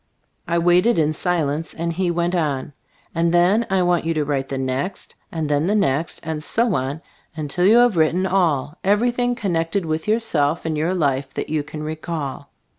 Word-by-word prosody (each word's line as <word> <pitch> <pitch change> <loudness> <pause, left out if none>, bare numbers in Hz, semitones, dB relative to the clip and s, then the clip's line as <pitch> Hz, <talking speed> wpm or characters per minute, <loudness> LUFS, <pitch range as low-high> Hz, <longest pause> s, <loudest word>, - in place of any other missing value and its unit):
I 170 0 +1
waited 175 +7 +3
in 155 -1 +2
silence 160 -2 -1
and 170 +1 -2
he 180 +1 0
went 175 +1 0
on: 145 -4 -1 0.4
"And 165 0 +1
then 180 +7 +3
I 190 -1 +2
want 175 -1 +2
you 165 0 -1
to 150 -1 0
write 135 -2 -2
the 135 - -3
next, 130 +8 -3 0.2
and 160 -2 -2
then 145 +2 +1
the 205 - +2
next, 165 -5 0
and 155 -1 -3
so 230 +5 +1
on, 140 +2 -2 0.3
until 160 +4 0
you 220 +3 +6
have 240 -6 +4
written 165 +4 +2
all 165 -6 0
— - - -46
everything 245 +3 +1
connected 175 -4 -1
with 160 +2 -3
yourself 170 -9 +1
and 160 -1 -1
your 165 +5 0
life 140 -5 -1
that - - -4
you 155 -1 0
can 150 +1 -7
recall. 155 -2 -5
165 Hz, 190 wpm, -21 LUFS, 150-185 Hz, 0.4 s, you